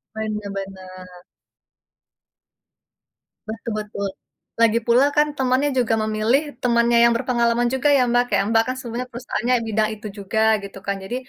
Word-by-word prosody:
Bener 215 Hz, -2 st, -4 dB
bener. 185 Hz, -2 st, -9 dB, 2.3 s
Betul 225 Hz, +1 st, -6 dB
betul. 200 Hz, -1 st, -4 dB, 0.5 s
Lagi 230 Hz, 0 st, +4 dB
pula 240 Hz, +4 st, +4 dB
kan 295 Hz, 0 st, +4 dB
temannya 265 Hz, +2 st, +1 dB
juga 245 Hz, -4 st, +1 dB
memilih 215 Hz, +5 st, +1 dB, 0.2 s
temannya 235 Hz, -1 st, +2 dB
yang 235 Hz, 0 st, +5 dB
berpengalaman 235 Hz, 0 st, +1 dB
juga 265 Hz, +2 st, 0 dB
ya, 265 Hz, -, +4 dB
Mbak. 245 Hz, 0 st, +4 dB
Kayak, -, -, +2 dB
Mbak, 225 Hz, 0 st, +4 dB
kan 255 Hz, -, -2 dB
sebenarnya 245 Hz, 0 st, -5 dB
perusahaannya 245 Hz, +1 st, -1 dB
bidang 220 Hz, 0 st, +1 dB
itu 215 Hz, 0 st, -9 dB
juga 200 Hz, +2 st, -2 dB, 0.2 s
gitu 195 Hz, 0 st, -9 dB
kan. 200 Hz, -, -2 dB
Jadi, 195 Hz, +6 st, -5 dB
230 Hz, 145 wpm, -21 LUFS, 210-245 Hz, 2.3 s, yang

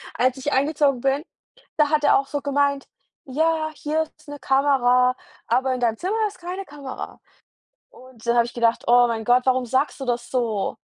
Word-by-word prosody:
als 255 Hz, +1 st, +1 dB
ich 265 Hz, +2 st, -3 dB
eingezogen 280 Hz, -2 st, +1 dB
bin, 275 Hz, +3 st, 0 dB, 0.5 s
da 300 Hz, -2 st, +3 dB
hat 305 Hz, -1 st, +1 dB
er 290 Hz, -, +5 dB
auch 275 Hz, -, -5 dB
so 290 Hz, +1 st, -3 dB
gemeint: 280 Hz, 0 st, 0 dB, 0.4 s
„Ja, 315 Hz, +3 st, 0 dB
hier 310 Hz, +2 st, -1 dB
ist 310 Hz, 0 st, -18 dB
'ne 290 Hz, 0 st, -8 dB
Kamera, 255 Hz, -2 st, +3 dB, 0.3 s
aber 260 Hz, +3 st, +1 dB
in 255 Hz, -, -3 dB
deinem 230 Hz, -2 st, 0 dB
Zimmer 380 Hz, -, -2 dB
ist 415 Hz, -, -11 dB
keine 365 Hz, +3 st, -6 dB
Kamera.“ 280 Hz, -4 st, -8 dB, 0.7 s
Und 255 Hz, -3 st, -16 dB
dann 235 Hz, 0 st, +2 dB
habe 235 Hz, -1 st, +4 dB
ich 235 Hz, -, -9 dB
gedacht: 235 Hz, -1 st, +1 dB
„Oh 245 Hz, 0 st, +6 dB
mein 225 Hz, -2 st, -3 dB
Gott, 250 Hz, +2 st, +3 dB
warum 255 Hz, -1 st, +2 dB
sagst 265 Hz, +5 st, 0 dB
du 270 Hz, -, -5 dB
das 240 Hz, -1 st, -2 dB
so?“ 230 Hz, -6 st, -1 dB
265 Hz, 190 wpm, -23 LUFS, 245-290 Hz, 0.7 s, Oh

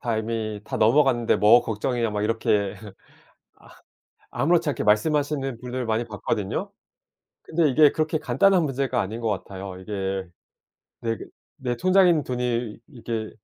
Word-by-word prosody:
다 115 Hz, -2 st, -1 dB
이미 110 Hz, -1 st, -3 dB
다 -, -, -4 dB
넘어갔는데 120 Hz, +1 st, +3 dB
뭐가 110 Hz, +4 st, +6 dB
걱정이냐?" 115 Hz, +1 st, -1 dB
막 105 Hz, 0 st, -2 dB
이렇게 105 Hz, -2 st, 0 dB, 1.6 s
아 -, -, -3 dB
아무렇지 165 Hz, +1 st, +3 dB
않게 140 Hz, -, -1 dB
말씀하시는 135 Hz, +4 st, +1 dB
분들 125 Hz, 0 st, -4 dB
많이 110 Hz, +1 st, 0 dB
봤거든요. 105 Hz, -2 st, -3 dB, 0.7 s
근데 160 Hz, -1 st, +1 dB
이게 150 Hz, +2 st, +5 dB
그렇게 155 Hz, 0 st, 0 dB
간단한 160 Hz, +6 st, +3 dB
문제가 135 Hz, -2 st, -1 dB
아닌 110 Hz, +5 st, -5 dB
것 115 Hz, -, -1 dB
같아요. 95 Hz, -1 st, -5 dB
이게 95 Hz, -1 st, -4 dB, 0.7 s
내 115 Hz, -1 st, -1 dB
그 -, -, -9 dB, 0.3 s
내 125 Hz, -3 st, -3 dB
통장에 185 Hz, +2 st, +4 dB
있는 160 Hz, -4 st, +2 dB
돈이 120 Hz, -3 st, -2 dB
이게 115 Hz, -5 st, -5 dB
120 Hz, 320 characters per minute, -24 LUFS, 110-140 Hz, 1.6 s, 뭐가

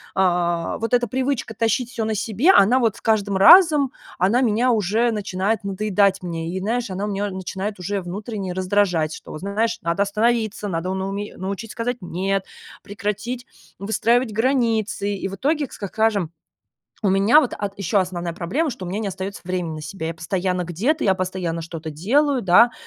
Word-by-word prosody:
а, 175 Hz, -2 st, +1 dB
вот 230 Hz, +2 st, -3 dB
эта 245 Hz, -1 st, +3 dB
привычка 260 Hz, -1 st, -2 dB
тащить 230 Hz, +2 st, 0 dB
всё 225 Hz, -3 st, -2 dB
на 220 Hz, 0 st, -1 dB
себе, 225 Hz, -, +3 dB
она 250 Hz, -, +5 dB
вот 230 Hz, -5 st, +1 dB
с -, -, -15 dB
каждым 205 Hz, -3 st, +1 dB
разом, 300 Hz, -, +7 dB, 0.3 s
она 195 Hz, +8 st, +3 dB
меня 245 Hz, +1 st, +2 dB
уже 220 Hz, +3 st, +1 dB
начинает 205 Hz, 0 st, -1 dB
надоедать 200 Hz, -1 st, +1 dB
мне. 165 Hz, -2 st, -4 dB
И, -, -, -1 dB
знаешь, 230 Hz, +4 st, -1 dB
она 190 Hz, +2 st, -3 dB
меня 205 Hz, 0 st, -2 dB
начинает 190 Hz, +2 st, -5 dB
уже 200 Hz, +3 st, -2 dB
внутренне 195 Hz, +1 st, -5 dB
раздражать. 185 Hz, -4 st, +1 dB
Что, -, -, -10 dB
вот -, -, -7 dB
знаешь, 220 Hz, +4 st, -1 dB
надо 170 Hz, +2 st, +1 dB
остановиться, 215 Hz, 0 st, 0 dB
надо 180 Hz, +1 st, -2 dB
на 190 Hz, 0 st, -2 dB
уме 205 Hz, +1 st, -5 dB
научить 200 Hz, +4 st, -5 dB
сказать 240 Hz, +1 st, -2 dB
"нет", 190 Hz, +2 st, -2 dB, 0.4 s
прекратить 210 Hz, +5 st, -4 dB, 0.3 s
выстраивать 225 Hz, +4 st, +1 dB
границы. 225 Hz, -4 st, 0 dB
И 195 Hz, -, -4 dB
в 195 Hz, -, -6 dB
итоге, 290 Hz, +6 st, 0 dB
к -, -, -16 dB
ска 200 Hz, -, -5 dB
скажем, 205 Hz, -5 st, 0 dB, 0.7 s
у 200 Hz, -, +3 dB
меня 200 Hz, +9 st, +5 dB
вот 255 Hz, -, -2 dB
ат 205 Hz, -1 st, -3 dB
еще 200 Hz, +1 st, +1 dB
основная 175 Hz, -2 st, -3 dB
проблема, 200 Hz, -, -1 dB
что 210 Hz, -6 st, -7 dB
у -, -, -5 dB
меня 195 Hz, +4 st, -2 dB
не 220 Hz, -, -2 dB
остается 190 Hz, +1 st, -6 dB
времени 180 Hz, -3 st, -3 dB
на 155 Hz, -, -7 dB
себя. 160 Hz, +1 st, -5 dB
Я 165 Hz, -, -3 dB
постоянно 180 Hz, +2 st, -1 dB
где-то, 225 Hz, -, -1 dB
я 190 Hz, -, +4 dB
постоянно 185 Hz, -3 st, -3 dB
что-то 165 Hz, -1 st, -7 dB
делаю, 260 Hz, -, +1 dB
да. 195 Hz, +6 st, +6 dB
200 Hz, 185 wpm, -22 LUFS, 185-230 Hz, 0.7 s, разом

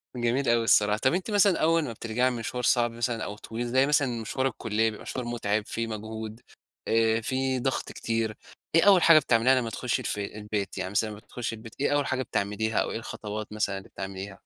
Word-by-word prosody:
جميل 120 Hz, +3 st, 0 dB
أوي 115 Hz, 0 st, +3 dB
الصراحة، 105 Hz, -1 st, +4 dB
طب 130 Hz, +6 st, +2 dB
أنتِ 185 Hz, +4 st, -2 dB
مثلًا 200 Hz, -3 st, +4 dB
أول 165 Hz, +1 st, +3 dB
ما 125 Hz, -6 st, -4 dB
بترجعي 115 Hz, +3 st, 0 dB
من 120 Hz, -, -4 dB
مشوار 125 Hz, +2 st, -4 dB
صعب 120 Hz, 0 st, +3 dB
مثلًا 115 Hz, 0 st, -2 dB
أو 105 Hz, +1 st, -5 dB
طويل 115 Hz, +2 st, -5 dB
زي 130 Hz, +3 st, +3 dB
مثلًا 135 Hz, -6 st, +1 dB
مشوار 130 Hz, +4 st, -1 dB
الكلِّية، 110 Hz, -2 st, 0 dB
بيبقى 110 Hz, -, -9 dB
مشوار 125 Hz, -, -5 dB
متعب، 110 Hz, -3 st, -1 dB
فيه 115 Hz, 0 st, -3 dB
مجهود، 110 Hz, +1 st, -6 dB, 0.5 s
آآ 115 Hz, 0 st, +3 dB
فيه 130 Hz, +2 st, -1 dB
ضغط 135 Hz, +1 st, -2 dB
كتير، 115 Hz, -2 st, -2 dB, 0.4 s
إيه 165 Hz, -, +6 dB
أول 195 Hz, -3 st, +7 dB
حاجة 165 Hz, -2 st, +8 dB
بتعمليها 130 Hz, -2 st, +3 dB
لما 120 Hz, -3 st, 0 dB
تخشي 120 Hz, 0 st, -2 dB
الفي 105 Hz, 0 st, -3 dB
البيت؟ 105 Hz, -1 st, -3 dB
يعني 95 Hz, 0 st, -3 dB
مثلا 110 Hz, +2 st, +1 dB
أمّا 105 Hz, -, -8 dB
بتخشي 120 Hz, 0 st, -5 dB
البيت، 115 Hz, 0 st, -12 dB
إيه 145 Hz, -, +1 dB
أول 145 Hz, -, +1 dB
حاجة 130 Hz, -1 st, -1 dB
بتعمليها 110 Hz, +1 st, -1 dB
أو -, -, 0 dB
إيه -, -, -3 dB
الخطوات 105 Hz, -1 st, -6 dB
مثلًا 100 Hz, -2 st, -1 dB
اللي 95 Hz, -, -11 dB
بتعمليها؟ 95 Hz, 0 st, -7 dB
115 Hz, 210 wpm, -27 LUFS, 110-130 Hz, 0.5 s, حاجة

